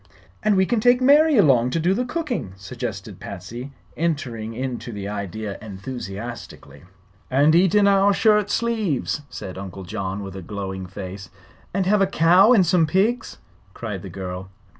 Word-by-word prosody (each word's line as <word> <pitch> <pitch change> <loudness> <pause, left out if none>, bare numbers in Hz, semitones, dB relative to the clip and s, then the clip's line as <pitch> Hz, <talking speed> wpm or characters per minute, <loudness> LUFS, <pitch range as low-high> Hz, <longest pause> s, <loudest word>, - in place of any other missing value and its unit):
"And 215 -1 +2
we 190 - +4
can 240 +3 0
take 245 +3 +4
Mary 290 +3 +5
along 130 - +5
to 165 - -1
do 175 +4 +2
the 250 +5 -1
cooking," 250 - -3
suggested 95 0 -6
Patsy, 120 +9 -8 0.2
entering 125 -9 -2
into 125 -1 -4
the 100 -2 -5
idea 105 0 -5
enthusiastically. 110 0 -8 0.4
"And 145 +4 +4
eat 180 +3 +4
in 205 -1 +5
our 200 0 +5
shirt 210 0 +3
sleeves!" 215 - -1
said 95 -2 -7
Uncle 95 0 -7
John, 100 +1 -4
with 95 -1 -8
a 95 - -6
glowing 95 0 -5
face. 95 0 -8 0.4
"And 195 0 0
have 205 +2 +3
a 195 - +4
cow 185 +4 +5
and 205 -7 +6
some 165 -1 +3
pigs!" 215 +8 0 0.4
cried 105 -5 -5
the 95 - -8
girl. 90 0 -6
130 Hz, 160 wpm, -23 LUFS, -, 0.4 s, and